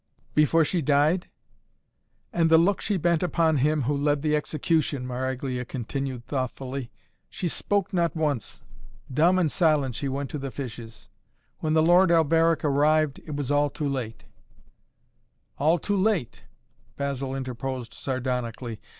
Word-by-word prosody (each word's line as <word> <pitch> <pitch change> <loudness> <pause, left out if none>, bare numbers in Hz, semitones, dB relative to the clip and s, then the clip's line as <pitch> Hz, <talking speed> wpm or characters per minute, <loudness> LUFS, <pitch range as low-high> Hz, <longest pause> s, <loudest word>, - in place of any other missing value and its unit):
"Before 155 +2 +4
she 175 +2 0
died?" 150 +5 +2 1.0
"And 165 -1 +2
the 160 - +7
look 185 +4 +2
she 205 - 0
bent 170 -1 +1
upon 165 -3 +2
him 150 +2 +2
who 145 +4 0
led 145 0 0
the 150 -1 +2
execution," 150 -2 0
Maraglia 130 0 -3
continued 130 0 -5
thoughtfully. 130 -1 -4 0.4
"She 180 - -3
spoke 200 +4 -1
not 170 -3 +1
once. 150 -7 -2 0.5
Dumb 170 +7 +4
and 170 -5 +2
silent 150 -7 +2
she 140 +4 -3
went 135 0 -3
to 150 - -4
the 135 0 -4
fishes. 120 -4 -8 0.5
When 155 -1 -1
the 160 0 +4
Lord 175 +2 +5
Alberic 165 -1 +3
arrived, 150 +1 +2
it 150 - -4
was 145 -1 -3
all 145 0 +3
too 150 0 -3
late 125 -5 -4 0.7
" - - -45
"All 155 +5 +3
too 205 +4 -1
late!" 190 - 0 0.5
Basil 140 -1 -3
interposed 130 -2 -5
sardonically. 125 -3 -3
145 Hz, 145 wpm, -26 LUFS, 130-165 Hz, 1.0 s, the